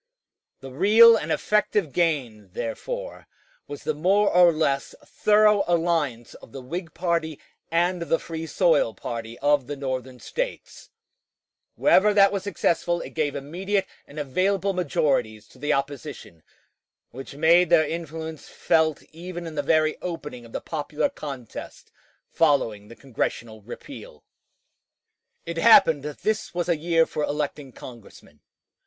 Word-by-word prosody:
The 135 Hz, -1 st, -9 dB
real 220 Hz, -, +7 dB
and -, -, -3 dB
effective 210 Hz, -6 st, 0 dB
gain, 130 Hz, -, -1 dB
therefore, -, -, -6 dB, 0.4 s
was 145 Hz, -, -8 dB
the 155 Hz, -, -1 dB
more 195 Hz, +7 st, +2 dB
or 175 Hz, -1 st, +7 dB
less 145 Hz, -4 st, -1 dB
thorough 210 Hz, -1 st, +3 dB
alliance 165 Hz, -9 st, 0 dB
of -, -, -15 dB
the 135 Hz, -, -7 dB
Whig 165 Hz, +5 st, -6 dB
party 170 Hz, -4 st, -1 dB, 0.3 s
and 175 Hz, +2 st, +1 dB
the 165 Hz, -1 st, +1 dB
Free 165 Hz, 0 st, -7 dB
soil -, -, +2 dB
party 115 Hz, 0 st, -6 dB
of 145 Hz, -3 st, +2 dB
the 145 Hz, -, -4 dB
Northern 130 Hz, -2 st, -5 dB
States: -, -, -6 dB, 0.9 s
wherever 210 Hz, -7 st, +4 dB
that 200 Hz, -1 st, +6 dB
was 200 Hz, -1 st, -2 dB
successful 175 Hz, -2 st, -1 dB
it -, -, -8 dB
gave 150 Hz, -3 st, -2 dB
immediate 185 Hz, +8 st, -2 dB, 0.2 s
and 145 Hz, -, -14 dB
available 190 Hz, +8 st, 0 dB
majorities 135 Hz, -, -1 dB
to 130 Hz, -, -19 dB
the 145 Hz, +2 st, -1 dB
opposition, 140 Hz, -, -4 dB, 0.7 s
which 135 Hz, +2 st, -10 dB
made 165 Hz, +3 st, +4 dB
their 165 Hz, -2 st, +5 dB
influence 160 Hz, -1 st, -6 dB
felt 160 Hz, -3 st, +1 dB
even 175 Hz, +2 st, -8 dB
in 165 Hz, -, -7 dB
the 145 Hz, -, -1 dB
very 155 Hz, +1 st, +1 dB
opening 150 Hz, -9 st, -7 dB
of -, -, -18 dB
the -, -, -5 dB
popular 150 Hz, -, -2 dB
contest 140 Hz, -, -9 dB, 0.4 s
following 125 Hz, -10 st, +1 dB
the 115 Hz, -, -13 dB
Congressional 115 Hz, -4 st, -4 dB
repeal. 75 Hz, -6 st, -11 dB, 1.2 s
It 170 Hz, 0 st, -5 dB
happened 165 Hz, -7 st, +6 dB
that 150 Hz, +1 st, -8 dB
this 215 Hz, -3 st, -2 dB
was 175 Hz, -1 st, -1 dB
a 170 Hz, -, +2 dB
year 165 Hz, +1 st, +2 dB
for 150 Hz, -, -4 dB
electing 145 Hz, -2 st, -3 dB
Congressmen. 115 Hz, -, -14 dB
160 Hz, 140 wpm, -24 LUFS, 135-180 Hz, 1.2 s, real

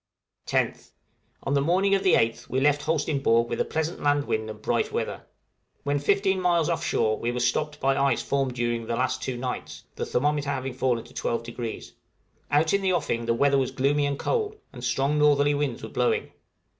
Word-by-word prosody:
10th. -, -, -1 dB, 0.5 s
On 135 Hz, -, -1 dB
the 140 Hz, -, +3 dB
morning 185 Hz, +6 st, +2 dB
of 195 Hz, -, +3 dB
the 185 Hz, -, +4 dB
8th 115 Hz, 0 st, 0 dB
we 130 Hz, -, 0 dB
left 145 Hz, +1 st, +3 dB
Holsteinborg 140 Hz, -7 st, +1 dB
with -, -, -2 dB
a -, -, +1 dB
pleasant 160 Hz, +2 st, -3 dB
land 145 Hz, 0 st, +2 dB
wind 110 Hz, 0 st, -2 dB
and 105 Hz, 0 st, -8 dB
bright -, -, 0 dB
weather. -, -, -3 dB, 0.6 s
When 145 Hz, 0 st, 0 dB
15 195 Hz, +4 st, +2 dB
miles 170 Hz, -3 st, +2 dB
off -, -, -1 dB
shore 110 Hz, 0 st, +1 dB
we 120 Hz, -, -1 dB
were 125 Hz, -, -3 dB
stopped 150 Hz, +5 st, 0 dB
by 135 Hz, 0 st, +2 dB
ice 140 Hz, 0 st, +1 dB
formed 135 Hz, -3 st, -1 dB
during 120 Hz, -1 st, -1 dB
the 115 Hz, -, -1 dB
last 130 Hz, +2 st, -1 dB
two 130 Hz, -2 st, -3 dB
nights, 125 Hz, 0 st, -5 dB
the -, -, -3 dB
thermometer 145 Hz, +2 st, 0 dB
having 135 Hz, -2 st, -2 dB
fallen 125 Hz, -2 st, 0 dB
to 120 Hz, -, -16 dB
12°; 115 Hz, 0 st, -4 dB, 0.6 s
out 155 Hz, +4 st, +3 dB
in 200 Hz, -, +3 dB
the 190 Hz, -1 st, +1 dB
offing 120 Hz, -9 st, -1 dB
the 115 Hz, -, +2 dB
weather 140 Hz, +2 st, +3 dB
was 130 Hz, -, 0 dB
gloomy 145 Hz, +2 st, +1 dB
and 140 Hz, -1 st, -2 dB
cold, 430 Hz, -, -1 dB, 0.2 s
and 120 Hz, -2 st, -9 dB
strong 135 Hz, +5 st, +1 dB
northerly 145 Hz, -1 st, +4 dB
winds 145 Hz, -4 st, -2 dB
were -, -, -6 dB
blowing. -, -, 0 dB
140 Hz, 200 wpm, -26 LUFS, 120-150 Hz, 0.6 s, the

